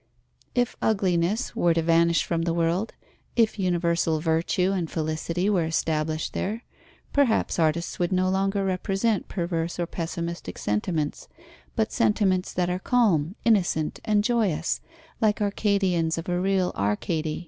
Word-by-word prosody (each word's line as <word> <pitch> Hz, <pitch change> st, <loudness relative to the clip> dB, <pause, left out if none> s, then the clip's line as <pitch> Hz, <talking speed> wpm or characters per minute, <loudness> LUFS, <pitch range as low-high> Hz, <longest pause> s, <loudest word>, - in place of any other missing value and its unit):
If 245 Hz, -1 st, +1 dB
ugliness 195 Hz, +1 st, +1 dB
were 170 Hz, -1 st, +2 dB
to 165 Hz, -, +2 dB
vanish 170 Hz, 0 st, +3 dB
from 165 Hz, -1 st, -1 dB
the 165 Hz, 0 st, 0 dB
world, 170 Hz, +6 st, 0 dB, 0.4 s
if 225 Hz, -2 st, +2 dB
universal 170 Hz, -3 st, +1 dB
virtue 165 Hz, +4 st, +1 dB
and 180 Hz, -5 st, -1 dB
felicity 160 Hz, +3 st, -2 dB
were 195 Hz, -5 st, +2 dB
established 155 Hz, -1 st, -1 dB
there, 220 Hz, +5 st, -3 dB, 0.5 s
perhaps 270 Hz, -9 st, +2 dB
artists 165 Hz, +1 st, 0 dB
would 175 Hz, 0 st, 0 dB
no 185 Hz, 0 st, +2 dB
longer 195 Hz, +1 st, +1 dB
represent 195 Hz, +3 st, 0 dB
perverse 170 Hz, -2 st, -2 dB
or 175 Hz, -, +1 dB
pessimistic 170 Hz, 0 st, -5 dB
sentiments, 145 Hz, -, -2 dB, 0.5 s
but 220 Hz, -2 st, 0 dB
sentiments 200 Hz, -5 st, +1 dB
that 180 Hz, -1 st, 0 dB
are 180 Hz, +1 st, -1 dB
calm, 190 Hz, -8 st, +2 dB
innocent, 180 Hz, -8 st, +2 dB
and 210 Hz, -1 st, +2 dB
joyous, 205 Hz, -9 st, 0 dB, 0.4 s
like 210 Hz, -2 st, +2 dB
Arcadians 195 Hz, -5 st, +1 dB
of 165 Hz, -, -5 dB
a 175 Hz, 0 st, 0 dB
real 190 Hz, -1 st, +1 dB
Arcady. 155 Hz, -, -1 dB
180 Hz, 135 wpm, -25 LUFS, 165-200 Hz, 0.5 s, vanish